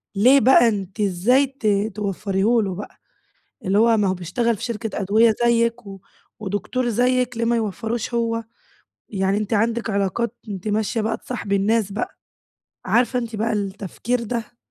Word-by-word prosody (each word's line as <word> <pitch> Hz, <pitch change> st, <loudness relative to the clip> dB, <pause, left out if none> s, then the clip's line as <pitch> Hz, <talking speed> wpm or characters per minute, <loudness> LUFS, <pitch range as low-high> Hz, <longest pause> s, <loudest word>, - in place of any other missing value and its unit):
ليه 255 Hz, +7 st, +6 dB
بقى 240 Hz, -1 st, +6 dB
أنتِ 200 Hz, -1 st, -5 dB
إزاي 205 Hz, +8 st, +3 dB
ت 265 Hz, -4 st, -5 dB, 0.3 s
توفّريه 205 Hz, +2 st, 0 dB
له 190 Hz, -2 st, -3 dB
بقى. 205 Hz, -, -9 dB, 0.6 s
اللي 195 Hz, +2 st, +2 dB
هو، 230 Hz, 0 st, +5 dB
ما 205 Hz, -2 st, +2 dB
هو 185 Hz, -, +1 dB
بيشتغل 210 Hz, +6 st, -1 dB
في -, -, -11 dB
شركة 225 Hz, -2 st, -4 dB
أدوية 220 Hz, +3 st, +4 dB
زيِّك، 235 Hz, -1 st, +1 dB
و 195 Hz, -1 st, -9 dB, 0.4 s
ودكتور 215 Hz, +5 st, -2 dB
زيِّك، 250 Hz, +1 st, +1 dB
ليه 230 Hz, -, 0 dB
ما 235 Hz, 0 st, +2 dB
يوفّرهوش 225 Hz, +2 st, -3 dB
هو؟ 230 Hz, -1 st, 0 dB, 0.7 s
يعني 195 Hz, -1 st, 0 dB
أنتِ 215 Hz, +1 st, -2 dB
عندِك 230 Hz, +2 st, 0 dB
علاقات، 205 Hz, +3 st, -1 dB
أنتِ 195 Hz, 0 st, -5 dB
ماشية 215 Hz, +2 st, 0 dB
بقى 220 Hz, +1 st, -1 dB
تصاحبي 205 Hz, -5 st, -3 dB
الناس 210 Hz, +1 st, +1 dB
بقى. 220 Hz, +5 st, -4 dB, 0.7 s
عارفة 250 Hz, +1 st, +2 dB
أنتِ 230 Hz, -2 st, -5 dB
بقى 225 Hz, +2 st, 0 dB
التفكير 205 Hz, +4 st, -3 dB
ده؟ 230 Hz, +1 st, -5 dB
220 Hz, 160 wpm, -22 LUFS, 200-235 Hz, 0.7 s, ليه